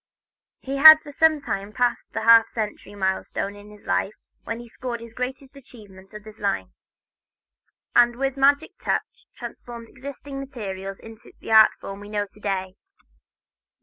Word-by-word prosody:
He 270 +1 -4
had 315 +2 +11
for 290 - -10
some 315 +1 +3
time 200 -5 -5
passed 245 0 -1
the 225 - -3
half 230 0 +7
century 210 -2 -6
milestone 190 +1 -2
of 205 0 -14
his 210 -1 -16
life 210 - -1 0.3
when 230 0 -4
he 240 - -11
scored 240 +1 -6
his 230 -1 -12
greatest 260 +3 -6
achievements 205 -8 -15
in 210 - -9
this 215 0 -13
line, 195 - -2 1.2
and 240 0 +5
with 270 +1 -2
magic 280 +1 +2
touch - - -3
transformed 235 -2 -9
existing 275 +1 -8
materials 195 -8 -7
into 225 0 -14
the - - -8
art 220 0 +7
form 195 0 -8
we 205 0 -11
know 205 -1 -2
to - - -17
day. 190 -2 -3
225 Hz, 160 wpm, -23 LUFS, 205-265 Hz, 1.2 s, had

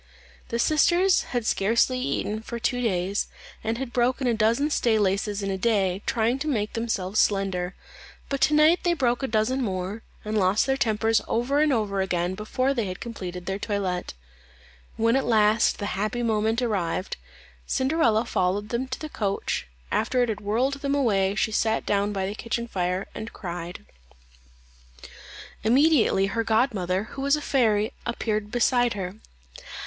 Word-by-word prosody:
The 235 - -1
sisters 345 +8 +3
had 245 -3 -3
scarcely 230 +6 +2
eaten 220 -4 -2
for 235 +1 -6
two 245 +1 -1
days, 195 -3 0 0.4
and 225 +1 -1
had 255 -1 -5
broken 255 +2 +1
a 240 - +2
dozen 230 +7 +2
stay 230 -5 +2
laces 200 0 0
a 195 -1 -1
day, 200 -4 +2
in 190 - -7
trying 235 +3 +1
to 305 - -3
make 215 -8 -1
themselves 215 -4 -1
slender; 190 -2 +1 0.5
but 275 -1 -3
to 300 - +4
night 310 +3 +5
they 345 -1 +1
broke 245 -4 +1
a 270 - -1
dozen 230 +4 +1
more, 190 -1 -3 0.2
and 215 +1 -2
lost 190 +2 +3
their 270 - +1
tempers 225 -3 +1
over 250 +5 +1
and 305 -1 +3
over 205 -5 0
again 180 -1 -1
before 255 +7 -1
they 235 -5 -1
had 185 -1 -5
completed 180 -6 -6
their 195 +1 -3
toilette. 195 - -2 0.8
When 230 +2 +3
at 270 - +2
last 215 -1 +3
the 205 - -4
happy 215 +6 -2
moment 220 +1 +1
arrived, 190 -5 -1 0.5
Cinderella 260 -5 +2
followed 200 0 0
them 245 +3 -2
to 260 - -5
the 310 - -5
coach; 200 - -2 0.2
after 245 +3 +1
it 240 - -1
had 210 -2 -3
whirled 250 +7 0
them 280 0 0
away, 200 -8 +2
she 220 - 0
sat 220 +1 0
down 205 0 +1
by 195 -2 -2
the 195 - -3
kitchen 235 +2 -3
fire 185 -2 -1
and 225 - -7
cried. 175 -1 -7 1.8
Immediately 250 -4 +4
her 225 +4 -1
godmother, 210 -5 +1
who 270 - -6
was 280 +1 +3
a - - -3
fairy, 225 -5 +1
appeared 215 -3 -2
beside 245 +1 +2
her. 185 -2 -4
220 Hz, 165 wpm, -25 LUFS, 195-245 Hz, 1.8 s, night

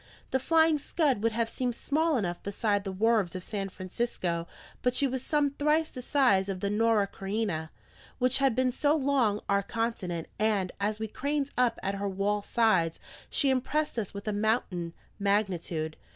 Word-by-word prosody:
The 265 - +2
Flying 320 +2 +4
Scud 285 -6 +1
would 225 0 +1
have 230 0 0
seemed 245 +1 -2
small 310 +2 +1
enough 175 -6 -2
beside 205 0 0
the 195 - -2
wharves 205 -2 +2
of 185 - -5
San 195 -1 -3
Francisco, 185 -3 -3 0.3
but 250 0 +1
she 280 - +4
was 260 -1 -2
some 295 -1 +1
thrice 300 +3 +1
the 250 - -8
size 240 -8 +3
of 190 -1 -3
the 200 +1 -1
Norah 220 -1 +3
Creina, 195 -5 -3 0.5
which 255 +1 +2
had 270 -4 +3
been 255 0 +2
so 290 +4 +2
long 260 -8 +2
our 200 0 +3
continent; 200 -7 -3
and 210 -4 +1
as 210 +2 -1
we 220 - -2
craned 285 +4 -2
up 245 -2 +2
at 195 - 0
her 200 0 -2
wall 200 +2 0
sides, 195 -7 +2 0.3
she 275 -2 +3
impressed 265 +1 0
us 205 - -4
with 200 +1 -8
a 215 - 0
mountain 205 -5 -1 0.2
magnitude. 180 -6 0
220 Hz, 180 wpm, -29 LUFS, 195-260 Hz, 0.5 s, Flying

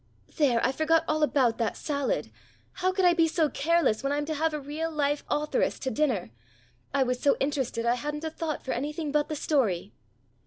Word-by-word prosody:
"There! 270 -7 +3
I 255 - +3
forgot 320 +3 +2
all 310 0 0
about 260 -6 +2
that 230 - -1
salad. 285 -3 -2 0.4
How 370 +1 0
could 380 0 +1
I 350 - +6
be 330 -1 +3
so 320 -1 +1
careless 300 -6 +1
when 275 - -1
I'm 290 0 0
to 315 - -2
have 315 +2 0
a 300 - -3
real 300 +3 -4
live 290 -2 0
authoress 300 +12 0
to 260 - -3
dinner? 255 - 0 0.6
I 275 -1 +2
was 250 -1 -1
so 280 - +3
interested 265 -5 -1
I 235 - +4
hadn't 295 +4 -4
a 320 - -3
thought 320 -1 -4
for 260 - -2
anything 295 +4 -3
but 295 +1 +1
the 305 - -2
story." 220 - 0
295 Hz, 205 wpm, -27 LUFS, 265-315 Hz, 0.6 s, I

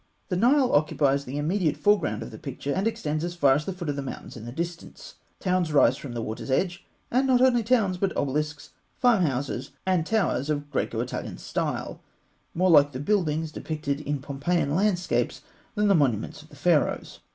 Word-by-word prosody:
The 180 - 0
Nile 250 +7 +4
occupies 140 -2 +2
the 130 +3 -5
immediate 160 +2 0
foreground 205 0 +2
of - - -9
the - - -10
picture, 140 0 -4
and 195 +3 0
extends 155 -8 -2
as 175 0 -3
far 140 -6 +5
as 150 +2 -1
the - - -2
foot 180 -2 -6
of 145 - -1
the 140 - -3
mountains 135 - -7
in 115 -2 -9
the 120 - -6
distance. 170 +4 -6 0.3
Towns 180 -3 0
rise 135 -4 +5
from 135 -3 -8
the 115 -1 -3
water's 110 +5 -5
edge; 175 +6 0 0.3
and 260 +3 +2
not 255 -2 +4
only 250 -2 +4
towns, 215 -6 +1
but 195 0 +1
obelisks, 145 +1 -2 0.3
farm 245 -6 +4
houses, 135 -2 -2 0.2
and 185 -3 +2
towers 175 - 0
of 145 -1 -2
Graeco - - -1
Italian - - -5
style, - - -3 0.5
more 185 +2 +3
like 145 -2 +6
the 130 - -4
buildings 160 -3 0
depicted 150 -2 -3
in 145 0 -2
Pompeian 140 +2 -1
landscapes 185 0 0 0.3
than 210 -1 +2
the 200 - +5
monuments 140 - +1
of - - -18
the - - -15
Pharaohs. - - +1
155 Hz, 195 wpm, -26 LUFS, 140-190 Hz, 0.5 s, like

